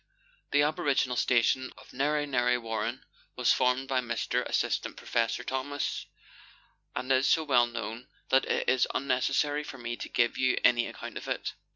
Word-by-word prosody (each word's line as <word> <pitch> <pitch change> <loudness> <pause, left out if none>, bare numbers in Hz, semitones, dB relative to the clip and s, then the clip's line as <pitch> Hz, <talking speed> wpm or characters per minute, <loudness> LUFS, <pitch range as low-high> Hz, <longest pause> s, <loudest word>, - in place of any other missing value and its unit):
The 145 0 +4
aboriginal 145 -4 +1
station 125 +2 +2
of - - -15
Narre 145 +3 +1
Narre 125 -3 +1
Warren 115 +1 -3 0.3
was 125 -2 +3
formed 130 +1 +1
by 130 -1 +1
Mr. 120 -2 -1
Assistant - - -1
Protector 115 +1 -1
Thomas, 130 +2 -3 0.9
and 130 +1 -2
is 130 +1 +4
so 160 - +3
well 125 -5 +4
known, 115 +1 -6 0.2
that 135 - +4
it - - -1
is 130 -1 +3
unnecessary 140 +3 +1
for 140 - -8
me 120 -1 -4
to - - -6
give 120 0 +1
you 130 -1 +2
any 120 -1 +4
account - - -8
of - - -11
it. - - -3
125 Hz, 165 wpm, -29 LUFS, 120-135 Hz, 0.9 s, The